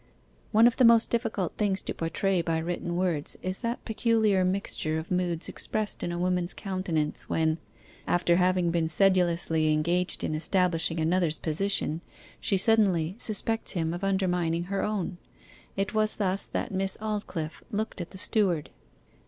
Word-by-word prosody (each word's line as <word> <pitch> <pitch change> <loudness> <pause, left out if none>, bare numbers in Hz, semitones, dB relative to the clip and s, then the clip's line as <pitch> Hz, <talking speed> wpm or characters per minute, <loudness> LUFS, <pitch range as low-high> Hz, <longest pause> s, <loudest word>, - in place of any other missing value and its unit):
One 220 +2 +6
of 240 - +4
the 260 - +4
most 230 -1 +6
difficult 220 -7 -1
things 195 -2 0
to - - -3
portray 180 +3 0
by 165 -1 -1
written 175 +1 -3
words 175 -5 +1
is 185 +1 -2
that 235 0 -3
peculiar 220 -4 +2
mixture 185 -4 -1
of 160 +3 -6
moods 180 -2 -1
expressed 215 -1 -3
in 175 - -2
a 175 - -3
woman's 180 0 0
countenance 185 -6 -2
when, 160 0 +1 0.5
after 175 -1 +2
having 180 -1 +2
been 165 -1 0
sedulously 170 -3 +3
engaged 170 +4 +1
in - - -1
establishing 165 0 +1
another's 165 0 +2
position, 165 -1 0 0.4
she 195 - +1
suddenly 190 -5 +3
suspects 225 +1 -1
him 165 -3 -1
of 175 +3 -6
undermining 180 -4 0
her 195 +2 -2
own. 195 -4 -2 0.6
It 195 0 -1
was 215 0 +1
thus 195 -1 0
that 240 - -3
Miss 190 0 0
Aldclyffe 195 -8 -4
looked 215 -2 -3
at 175 - -6
the 190 - -11
steward. 185 -5 0
180 Hz, 155 wpm, -28 LUFS, 165-200 Hz, 0.6 s, One